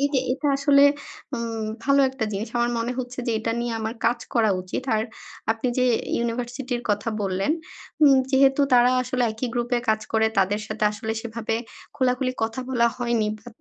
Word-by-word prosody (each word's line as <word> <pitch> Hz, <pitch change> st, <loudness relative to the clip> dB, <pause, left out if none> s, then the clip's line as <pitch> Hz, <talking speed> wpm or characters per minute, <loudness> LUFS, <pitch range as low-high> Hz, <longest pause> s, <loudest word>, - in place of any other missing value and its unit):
এই 285 Hz, -, +3 dB
যে 265 Hz, -, +4 dB
এটা 290 Hz, +2 st, -1 dB
আসলে। 280 Hz, 0 st, +5 dB, 0.5 s
উম 230 Hz, -2 st, -3 dB, 0.2 s
ভালো 280 Hz, 0 st, +4 dB
একটা 265 Hz, -4 st, -3 dB
জিনিস 210 Hz, +3 st, -3 dB
আমার 240 Hz, 0 st, +2 dB
মনে 235 Hz, +2 st, -1 dB
হচ্ছে 250 Hz, 0 st, -5 dB
যে 235 Hz, -, +1 dB
এটা 225 Hz, +1 st, -2 dB
নিয়ে 240 Hz, -1 st, -2 dB
আমার 220 Hz, +2 st, -3 dB
কাজ 240 Hz, +1 st, +2 dB, 0.2 s
করা 225 Hz, -3 st, +4 dB
উচিত। 185 Hz, +7 st, -4 dB
আর 215 Hz, -, +1 dB, 0.5 s
আপনি 225 Hz, +3 st, 0 dB
যে 255 Hz, -, +3 dB, 0.3 s
ইউনিভার্সিটির 245 Hz, +1 st, -3 dB
কথা 205 Hz, +2 st, 0 dB
বললেন 195 Hz, +7 st, 0 dB, 0.5 s
উম 280 Hz, -2 st, +7 dB
যেহেতু 270 Hz, +1 st, +4 dB
তারা 245 Hz, 0 st, +6 dB
আসলে 255 Hz, 0 st, -1 dB
একই 235 Hz, +3 st, -3 dB
গ্রুপে 240 Hz, 0 st, 0 dB
কাজ 220 Hz, 0 st, +3 dB
করে 220 Hz, 0 st, +3 dB
তাদের 200 Hz, +2 st, +2 dB
সাথে 215 Hz, -1 st, -2 dB
আসলে 220 Hz, +1 st, -4 dB
সেভাবে 225 Hz, -1 st, -3 dB, 0.4 s
খোলা-খুলি 255 Hz, -1 st, +1 dB
কথা 225 Hz, +3 st, -1 dB
বলা 235 Hz, -2 st, +3 dB
হয়নি 235 Hz, -3 st, +1 dB
বা, 220 Hz, -, -25 dB
235 Hz, 180 wpm, -24 LUFS, 220-255 Hz, 0.5 s, উম